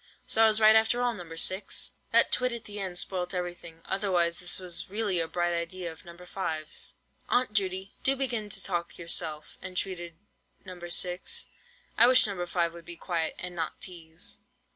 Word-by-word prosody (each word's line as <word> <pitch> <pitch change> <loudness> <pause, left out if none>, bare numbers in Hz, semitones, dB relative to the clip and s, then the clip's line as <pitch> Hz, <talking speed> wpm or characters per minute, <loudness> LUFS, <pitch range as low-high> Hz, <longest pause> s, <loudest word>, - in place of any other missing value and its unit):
So 225 - +2
I - - +8
was 215 0 +3
right 220 0 +8
after 225 +2 +3
all, 245 -1 +2
No. 175 -6 -8
6!" 185 +4 +1 0.2
That - - +4
twit 250 0 +3
at 235 -1 -4
the 205 0 -5
end 185 -2 -2
spoilt 180 0 -1
everything, 175 -2 -5
otherwise 180 -4 +1
this 175 -1 +1
was 180 -2 -3
really 205 -3 +1
a 165 - +1
bright 175 +1 0
idea 170 +1 -3
of 160 - -15
No. 170 - -10
5's. 175 -4 -4 0.3
"Aunt 245 -3 +2
Judy, 190 -1 -1
do 270 - +4
begin 240 -6 -1
to 195 -1 0
talk 170 -2 -2
yourself," 160 -2 0
entreated 180 -2 -3 0.5
No. 185 -1 -8
6. 180 - 0 0.5
"I 235 - +8
wish 255 0 +7
No. 195 -4 -2
5 170 -1 0
would 170 -1 -11
be 170 +1 -8
quiet, 165 -2 -2
and 180 0 -5
not 165 -2 -3
teaze." 165 -2 -4
180 Hz, 185 wpm, -29 LUFS, 170-205 Hz, 0.5 s, I